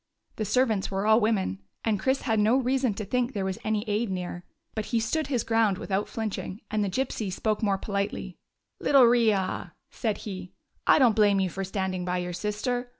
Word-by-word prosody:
The 215 - -1
ser 250 +6 +3
vants 215 -5 -1
were 195 +1 -2
all 220 +1 +6
women, 205 - 0 0.3
and 215 -3 +1
Chris 265 +5 0
had 225 -4 +1
no 220 +5 +4
reason 260 -3 +1
to 210 - -4
think 250 +4 0
there 195 -2 -2
was 190 -1 -3
any 215 0 -1
aid 210 +2 0
near; 180 -1 -4 0.3
but 215 -1 -3
he 230 - 0
stood 290 +7 -1
his 250 -5 0
ground 225 -4 +2
without 195 +2 -2
flinching, 215 -3 -4
and 215 -1 +1
the 200 - 0
Gypsy 220 -2 -2
spoke 215 +3 -1
more 200 -3 +2
politely. 200 -2 -3 0.2
" - - -55
Little 275 -3 +6
riah" 225 -5 +2 0.2
said 220 -4 -1
he, 185 -3 -6 0.3
"I - - +7
don't 245 -7 +5
blame 205 -2 +4
you 190 -2 0
for 195 +4 -4
standing 190 -1 -2
by 180 0 -1
your 180 0 -3
sister. 245 +6 -2
210 Hz, 210 wpm, -27 LUFS, 195-230 Hz, 0.3 s, I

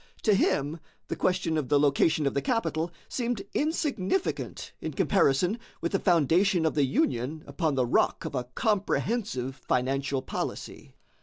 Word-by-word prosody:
To 215 - +4
him 155 -4 +1 0.3
the - - -1
question 180 -4 +1
of 135 -5 -4
the 145 - +4
location 150 +2 +3
of 140 - +1
the 140 - 0
capital 170 - 0 0.2
seemed 240 -4 -2
insignificant 300 - -1
in - - -4
comparison 180 - +2 0.2
with 170 - -2
the 195 - +1
foundation 175 +1 +3
of 160 - +2
the 145 -2 +3
Union 135 +3 -1
upon 160 -5 -1
the 130 -2 +2
rock 120 - +1
of - - -4
a 125 -2 -2
comprehensive 195 - -1
financial 135 +1 -1
policy. - - -5
160 Hz, 150 wpm, -28 LUFS, 135-195 Hz, 0.3 s, To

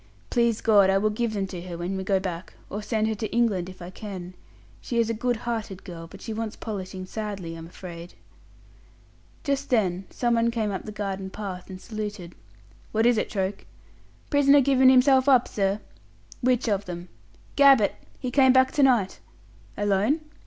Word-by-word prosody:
Please 235 -2 +2
God, 205 -4 +5
I 195 - +4
will 215 +2 +1
give 225 +1 -1
them 200 -2 -1
to 185 -2 -7
her 175 -1 -7
when 175 +3 -3
we 190 - -3
go 195 0 +2
back 185 -2 -6 0.2
or 205 - -3
send 215 +1 0
her 220 - 0
to 215 +1 -3
England 210 -7 +1
if 185 -1 -11
I 175 - -8
can. 185 -3 -7 0.5
She 235 - -3
is 230 -1 +2
a - - -1
good 245 +2 0
hearted 220 -5 -4
girl, 165 -2 -8
but 195 +3 -13
she 225 - -4
wants 220 -1 -4
polishing 190 -3 -6
sadly, 200 -4 -5
I'm 165 0 -8
afraid." 170 -1 -10 1.3
Just 280 -2 -1
then 190 -6 +1
someone 235 -1 +1
came 225 -3 -1
up 190 - -5
the 215 - -6
garden 195 -2 -4
path 190 -3 -7
and 185 -1 -8
saluted. 210 -5 -6 0.6
"What 220 +1 +2
is 240 -2 +4
it, - - -2
Troke?" 195 -1 -3 0.7
"Prisoner 285 -1 +6
given 265 -1 +5
himself 260 +1 +5
up, 255 -3 +5
sir." 195 0 0 0.6
"Which 250 -1 +2
of 200 -2 0
them?" 175 -1 -7 0.5
"Gabbett. 275 -7 +6 0.3
He 250 - -3
came 260 -1 +5
back 260 0 +5
to 290 - +1
night." 240 -8 +3 0.6
"Alone?" 205 +9 +1
210 Hz, 180 wpm, -26 LUFS, 190-235 Hz, 1.3 s, Prisoner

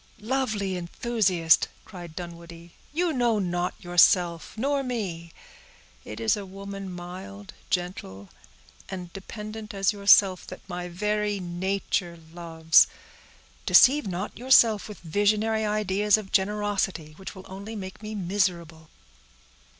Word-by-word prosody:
"Lovely 215 -5 -1
enthusiast!" 180 -3 +2 0.2
cried 175 -5 -10
Dunwoodie, 170 -1 -9 0.2
"you 335 +2 0
know 240 -4 +2
not 175 -2 -1
yourself, 175 0 +3
nor 280 +4 0
me. 195 -10 -4 0.7
It 105 +1 -8
is 115 -1 +2
a 205 - -6
woman, 195 0 -8
mild, 190 +3 -9 0.2
gentle, 140 - -4 0.6
and 180 -3 -7
dependent 215 +2 -8
as 195 +1 +2
yourself, 200 -2 +4
that - - -11
my 180 -1 -5
very 210 +3 -1
nature 180 -1 -2 0.2
loves; 165 -2 +4 0.8
deceive 275 -2 +6
not 190 +2 -4
yourself 230 -4 +4
with 210 - -10
visionary 215 +5 +1
ideas 210 0 +2
of 210 -3 -8
generosity, 195 -5 0
which 190 +1 -8
will 190 0 -11
only 200 +4 -8
make 190 -1 -8
me 215 0 -6
miserable." 175 -4 -2
195 Hz, 120 wpm, -26 LUFS, 175-210 Hz, 0.8 s, deceive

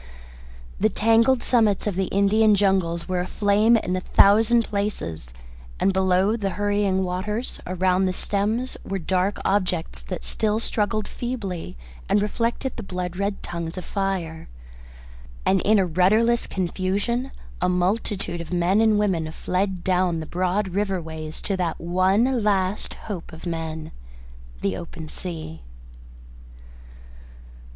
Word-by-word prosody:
The 215 - +3
tangled 230 +4 +3
summits 220 -5 +2
of 210 - 0
the 190 +1 0
Indian 205 +3 +4
jungles 190 -4 +1
were 185 -1 -1
aflame 205 +5 +3
in 185 -4 -2
a - - 0
thousand 225 +5 +5
places, 85 - -3 0.5
and 195 - +2
below 190 +2 +3
the 200 -4 -1
hurrying 205 -2 +1
waters 210 +6 -3
around 185 +1 +2
the 185 - +1
stems 215 +7 -1
were 195 - -3
dark 185 +3 0
objects 180 - 0
that - - -6
still 210 - 0
struggled 215 -2 -1
feebly 195 - -5 0.3
and 205 - +4
reflected 230 +5 -1
the - - -4
blood 180 -3 -4
red 200 +1 -2
tongues 170 0 -5
of 185 - -5
fire. 185 - -3 1.0
And 190 -1 +3
in 215 +1 +4
a 195 - +3
rudderless 215 +8 +3
confusion 200 +7 -1 0.3
a 180 - +2
multitude 180 0 -1
of 170 - -9
men 180 +4 +2
and 220 -2 +4
women 175 -7 0
fled 185 +2 -2
down 180 -2 +1
the 160 - -5
broad 185 +4 -1
river 195 0 -1
ways 160 -1 -7
to 195 - 0
that 175 -3 -2
one 195 +8 +2
last 195 -1 0
hope 190 -6 -6
of 160 +2 -11
men 160 -2 -4 0.7
the 95 -1 0
open 160 - -8
sea. 160 -3 -6
190 Hz, 135 wpm, -24 LUFS, 180-210 Hz, 1.0 s, thousand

